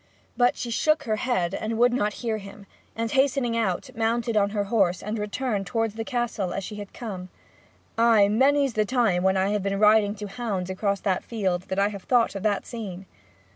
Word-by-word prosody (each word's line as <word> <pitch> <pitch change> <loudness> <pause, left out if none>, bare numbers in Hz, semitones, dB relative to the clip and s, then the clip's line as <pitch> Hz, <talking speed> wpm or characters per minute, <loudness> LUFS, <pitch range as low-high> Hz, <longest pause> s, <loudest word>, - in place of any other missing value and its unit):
But 245 0 +3
she 240 - -4
shook 310 +5 +2
her 220 -5 -1
head 190 -8 0
and 220 +2 -3
would 245 +1 +4
not 210 -4 0
hear 220 -2 0
him 200 0 -11 0.3
and 230 0 -2
hastening 265 -3 +2
out, 205 -6 -1
mounted 230 +1 0
her 205 0 +1
horse, 195 -4 +1
and 210 +2 -3
returned 210 -1 -2
towards 225 +2 -1
the 225 +1 -4
Castle 230 -7 -2
as 195 - -3
she 210 - -7
had 205 -1 -8
come. 190 -6 -7 0.7
Ay, 225 -3 +5
many's 270 +5 +3
the 215 - +2
time 220 -6 +1
when 190 +1 +2
I 190 +1 +2
have 210 0 0
been 195 +1 -1
riding 210 -1 +4
to 210 0 -6
hounds 195 -4 -3
across 200 +1 -1
that 190 -3 0
field 190 -6 -2
that 190 - -3
I 200 +1 +3
have 200 -2 -7
thought 245 -2 +3
of 195 - -5
that 205 -1 0
scene! 195 -6 -7
210 Hz, 205 wpm, -25 LUFS, 195-235 Hz, 0.7 s, Ay